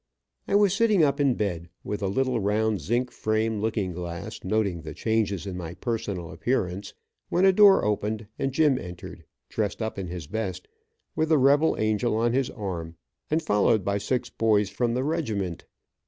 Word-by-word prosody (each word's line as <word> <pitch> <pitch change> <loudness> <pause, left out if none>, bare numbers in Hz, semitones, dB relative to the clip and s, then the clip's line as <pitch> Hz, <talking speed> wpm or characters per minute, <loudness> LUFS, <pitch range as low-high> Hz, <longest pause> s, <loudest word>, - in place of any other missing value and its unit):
I - - +1
was 205 -2 +5
sitting 210 -4 +3
up 140 -1 +2
in 140 -4 +3
bed, 85 -5 -3
with 105 - -4
a 100 - 0
little 130 +4 0
round 105 -1 +1
zinc 120 - 0
frame 110 0 0
looking 105 -4 -1
glass, 85 -1 -6
noting 95 -3 0
the - - -8
changes 110 -4 0
in 95 -2 -5
my 85 -1 -6
personal 100 -5 -3
appearance, 90 +2 -2 0.3
when 180 +2 +3
a 190 - +6
door 200 0 +6
opened 105 +1 -1
and 135 -1 0
Jim 140 -2 +3
entered, 90 -1 -9 0.2
dressed 105 -3 -2
up 110 -3 -3
in 95 - -4
his 85 -2 -6
best, 105 +3 -4 0.5
with 160 0 0
the 160 - +5
rebel 145 +4 +4
angel 110 +1 +1
on 115 +1 +1
his 130 0 +1
arm, 85 -7 -5 0.3
and 160 +2 +1
followed 105 - +2
by 100 0 0
six 125 +5 -1
boys 105 -3 +2
from 120 -1 0
the 130 - 0
regiment. 110 - -2
110 Hz, 180 wpm, -26 LUFS, 95-130 Hz, 0.5 s, a